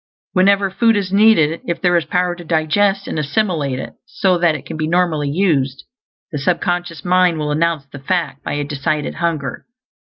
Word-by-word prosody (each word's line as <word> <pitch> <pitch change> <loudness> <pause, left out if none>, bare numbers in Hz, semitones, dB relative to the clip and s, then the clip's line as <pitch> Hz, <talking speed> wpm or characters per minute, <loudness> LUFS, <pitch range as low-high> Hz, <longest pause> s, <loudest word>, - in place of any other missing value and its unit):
Whenever 195 +1 +3
food 225 +2 +3
is 195 -2 -3
needed, 195 -7 +4
if 170 - -2
there 175 -1 +2
is 170 -2 +1
power 180 +2 0
to 175 0 -10
digest 185 +5 +1
and - - -3
assimilate 150 -4 -1
it, - - -7
so 185 -2 +1
that 170 -2 +2
it 145 -1 -8
can 160 - -7
be 155 0 -2
normally 165 -4 +1
used, 140 -6 0 0.5
the 150 - -3
sub 170 +5 +1
conscious 175 -5 -3
mind 180 -2 +3
will 150 -1 -2
announce 160 -1 0
the 140 +1 -11
fact 150 -1 -2
by - - -3
a 145 0 -1
decided 145 +1 -2
hunger. 155 -6 -3
170 Hz, 190 wpm, -18 LUFS, 150-185 Hz, 0.5 s, needed